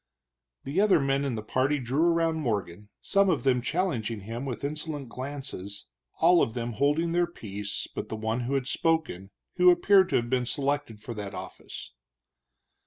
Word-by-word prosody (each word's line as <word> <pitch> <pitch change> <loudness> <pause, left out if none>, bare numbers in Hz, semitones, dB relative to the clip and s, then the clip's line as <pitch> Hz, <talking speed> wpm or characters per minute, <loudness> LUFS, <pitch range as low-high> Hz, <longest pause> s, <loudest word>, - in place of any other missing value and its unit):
The 150 +8 0
other 205 -5 +5
men 135 0 +1
in 135 -4 -1
the 110 - -5
party 130 +6 +1
drew 130 +3 -1
around 165 -1 +3
Morgan, 105 - -3
some 200 -1 +3
of 160 - +1
them 130 -2 +3
challenging 120 - -1
him 115 +6 -5
with 125 -3 -5
insolent 150 -2 -4
glances, 130 -7 -6 0.3
all 170 +1 +6
of 115 - 0
them 120 -1 -3
holding 145 +7 +1
their 175 0 +2
peace 105 - -5
but - - -7
the - - -3
one 110 +2 -1
who 125 +3 -1
had 135 -2 0
spoken, 155 - 0 0.3
who 180 0 +7
appeared 185 +2 +5
to - - 0
have 120 - +1
been 125 -2 +1
selected 140 -6 -1
for 120 - -6
that 100 -3 -6
office. - - -8
135 Hz, 175 wpm, -28 LUFS, 115-160 Hz, 0.3 s, who